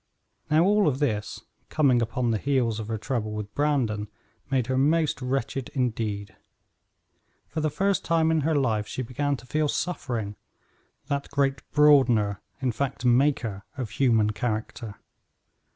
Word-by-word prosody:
Now, 155 +2 +4
all 205 0 +4
of 135 -3 +1
this, 110 -8 -2 0.3
coming 135 -6 +3
upon 115 +1 0
the 110 - 0
heels 125 -5 0
of 110 - -5
her 110 0 -2
trouble 110 -1 -3
with 105 -1 -6
Brandon, 125 -8 0 0.4
made 130 -3 +1
her 130 +1 -1
most 150 +2 +2
wretched 130 0 -2
indeed. 110 -6 -2 1.1
For 155 +2 -3
the 155 - +1
first 195 +6 0
time 165 -1 +2
in 160 -1 +2
her 155 +2 +1
life 110 -7 +1
she 130 - -4
began 140 +4 -1
to 125 - -14
feel 150 +4 0
suffering; 120 - -3 0.7
that 140 0 -3
great 140 -1 0
broadener, 125 -9 +4 0.2
in 125 - +2
fact, 130 +2 -3
maker, 120 -5 +2
of 125 -6 -4
human 110 -3 +3
character. 110 -1 -4
130 Hz, 150 wpm, -26 LUFS, 110-145 Hz, 1.1 s, Now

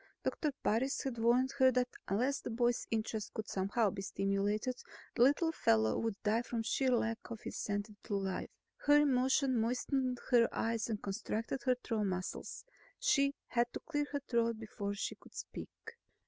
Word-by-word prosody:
Doctor 300 - 0
Parris 250 +6 +1
had 255 -4 -3
warned 245 +3 +3
her 260 0 +7
that 250 0 +2 0.2
unless 250 +8 +1
the - - -5
boy's 240 +1 +1
interest 220 -2 -2
could 220 - -3
somehow 200 +2 +1
be 195 - -5
stimulated, 200 +5 -1 0.3
the - - -1
little 290 +6 +5
fellow 110 - +3
would 225 -3 -1
die 220 +2 +2
from 235 -1 -3
sheer 260 +3 +1
lack 230 -2 +1
of 230 -2 -6
incentive 205 0 -3
to 205 - -2
live. 195 -1 -2 0.4
Her 295 0 +7
emotion 265 -1 +3
moistened 250 +2 0
her 235 -2 +6
eyes 225 0 -1
and 215 -2 -3
constricted 220 +5 -3
her 255 -1 +4
throat 220 -3 0
muscles. 185 -1 -4 0.3
She 280 - +3
had 240 0 +1
to - - -4
clear 290 -2 -2
her 285 -1 -2
throat 230 -1 +1
before 205 -2 -4
she 200 - -2
could - - -18
speak. - - -6
230 Hz, 170 wpm, -34 LUFS, 210-260 Hz, 0.4 s, her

